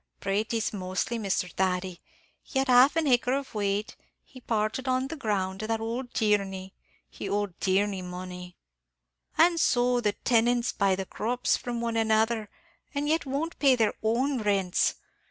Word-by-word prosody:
"Pratees 215 +3 -1
mostly, 190 +5 -2
Misthur 195 -3 -1
Thady. 185 -1 -1 0.4
He 270 - -6
had 265 0 +1
half 255 +4 +6
an 325 -1 +1
acre 250 -2 +3
of 275 0 -3
whate; 205 0 -1 0.3
he 255 - -15
parted 220 +2 -1
that - - -1
on 255 +1 0
the 325 - -4
ground 195 -8 -2
to 215 +2 -3
ould 240 +3 -4
Tierney; 195 -3 0 0.3
he - - -7
owed 205 -2 -1
Tierney 195 0 +1
money." 180 0 -8 0.8
"An' 335 +1 +5
so 245 -3 +2
the 210 -3 +1
tenants 240 +1 +2
buy 195 -2 +2
the 190 0 -4
crops 245 +6 0
from 240 -1 -4
one 230 -1 -1
another, 220 0 +1 0.5
and 285 +1 -1
yet 315 -1 +1
won't 290 +5 -3
pay 275 -3 +5
their 225 -3 +2
own 250 +4 +1
rents. 195 -4 +1
220 Hz, 160 wpm, -27 LUFS, 195-250 Hz, 0.8 s, half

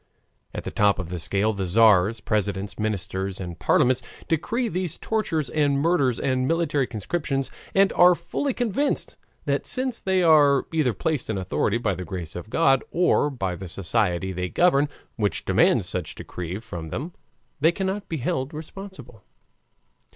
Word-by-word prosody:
At - - -4
the - - -5
top 105 -1 +3
of 95 -3 -5
the 90 -1 -4
scale 100 +6 +1
the 100 -2 -3
Tzars, 105 +2 +4
presidents, 100 -1 -2
ministers, 100 -2 -2
and 85 -3 -6
parliaments 130 +4 +3 0.3
decree 230 - 0
these 180 -3 -3
tortures 165 -10 -1
and 145 -2 +1
murders 140 -6 +2
and 130 -1 0
military 150 -5 +1
conscription, 135 - -2 0.3
and 195 0 +4
are 180 0 +6
fully 170 +12 -2
convinced 245 +4 -1 0.3
that - - -1
since 255 -2 -1
they 190 -1 +1
are 145 -4 +5
either 150 -7 +2
placed 155 0 -2
in 110 - -1
authority 95 +3 0
by 110 -4 0
the 90 - -5
grace 85 -2 -6
of 90 +4 -7
God 135 -1 +3
or 175 -4 +2
by 95 -10 -3
the 95 +2 -8
society 95 0 -1
they 90 0 -3
govern, 150 - +3 0.3
which 105 -3 -1
demands - - +3
such - - -4
decrees 90 +5 -6
from 85 -7 -6
them, 160 - -5 0.5
they 160 +4 +4
cannot 190 +3 -3
be 160 - -2
held 130 +3 -2
responsible. 155 - -10
130 Hz, 160 wpm, -24 LUFS, -, 0.5 s, are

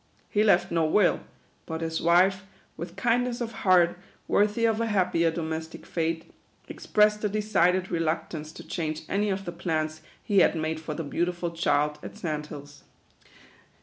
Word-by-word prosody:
He 210 - +2
left 210 - +3
no 165 -1 +2
will; 180 +4 +3 0.5
hut 160 0 -4
his 160 0 -2
wife, 185 +3 +4 0.3
with 170 +2 -7
kindness 245 +4 +1
of 235 -2 -3
heart 180 -5 +3 0.3
worthy 210 +3 +2
of 225 0 +1
a 230 - 0
happier 180 -5 +2
domestic 160 -1 -5
fate, 165 -1 -3 0.3
expressed 210 0 +2
a 210 - +1
decided 195 -3 +1
reluctance 160 -2 -2
to - - -10
change 155 -2 -3
any 205 +2 0
of 195 0 -2
the 175 - -4
plans 155 -2 -2 0.2
he 200 -2 +3
had 180 - +4
made 160 0 -2
for 160 -1 -5
the 165 - -3
beautiful 175 +3 -2
child 150 -3 +1
at - - -9
Sand 155 -6 -3
Hills. 145 -1 -11
170 Hz, 160 wpm, -27 LUFS, 160-200 Hz, 0.5 s, wife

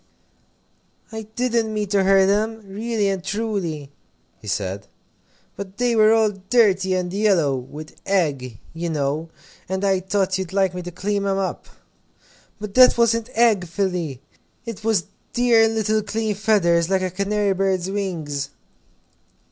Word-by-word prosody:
"I 220 -1 -7
didn't 235 -3 0
mean 210 -1 -2
to 200 -1 +2
hurt 195 0 +5
'em, 220 +2 0
really 215 +1 -1
and 195 -2 -2
truly," 190 -9 -3 0.5
he - - -13
said, 100 -1 -3 0.7
"but 200 0 -8
they 245 -1 +1
were 215 0 +6
all 220 -1 +4
dirty 195 -2 +2
and 180 -1 -2
yellow 190 -9 +2
with 145 +5 -9
egg, 140 - 0 0.2
you 170 +1 -3
know, 150 +1 -2 0.4
and 190 +1 -1
I 195 -1 +2
thought 190 0 0
you'd 190 -1 -5
like 190 -2 +2
me 180 - -5
to 180 0 -7
clean 200 +3 -2
'em 195 0 +1
up." 195 -1 -3 0.9
"But 210 -1 -6
that 255 0 +7
wasn't 230 0 +2
egg, 220 -6 +3
Philly 170 -7 -2 0.4
it 230 -3 -7
was 215 -7 +1 0.3
dear 235 -2 +4
little 220 -1 0
clean 215 +1 -2
feathers, 180 -5 +2
like 190 -1 +1
a 185 - -2
canary 200 +1 0
bird's 190 -1 0
wings." 160 -9 -3
195 Hz, 150 wpm, -22 LUFS, 175-215 Hz, 0.9 s, that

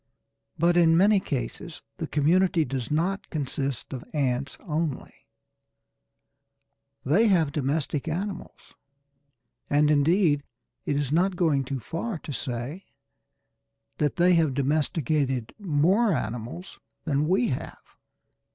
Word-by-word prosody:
But 170 +2 +3
in 165 -1 +5
many 200 +3 +5
cases 155 +1 -5
the 160 - -4
community 165 +3 +2
does 130 -3 -4
not 175 +6 -1
consist 140 -3 -3
of 130 - -6
ants 135 -1 -1
only. 155 -3 -3 1.9
They 195 +12 +4
have 165 -8 +3
domestic 145 0 -1
animals, 185 +3 -5 1.0
and 150 +1 +3
indeed 150 +1 +3 0.5
it 145 - +1
is 140 -2 -1
not 180 +4 +2
going 155 -6 +1
too 135 0 -3
far 170 - -4
to 150 - -8
say 130 +8 -4 1.1
that 150 -2 +1
they 180 +1 +4
have 160 -6 +2
domesticated 140 -3 0
more 190 +5 +2
animals 120 - -5 0.2
than 150 -1 0
we 190 +7 +2
have. - - -6
155 Hz, 115 wpm, -26 LUFS, 140-175 Hz, 1.9 s, in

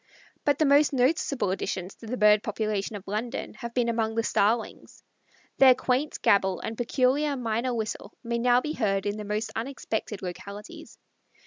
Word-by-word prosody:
But 290 -2 +3
the 310 - +3
most 285 +1 +4
noticable 265 - +1
additions 185 0 -3
to 225 - -11
the 250 +3 -3
bird 210 -1 +5
population 215 -1 -2
of 200 -1 -9
London 215 +4 -3
have 235 -3 -7
been 245 -2 +2
among 225 -1 0
the 230 - +1
Starlings. 220 +1 -1 0.6
Their 260 -2 +8
quaint 260 +4 -1
gabble 190 -2 +3
and 225 - -5
peculiar 265 +4 +1
minor 235 +1 -1
whistle 220 -1 -4
may 235 0 -2
now 245 +1 +4
be 305 +2 -3
heard 195 -7 0
in 205 +1 -1
the 210 - -6
most 210 +2 -2
unexpected 225 -4 -4
localities. 205 - -8
230 Hz, 165 wpm, -27 LUFS, 210-255 Hz, 0.6 s, Their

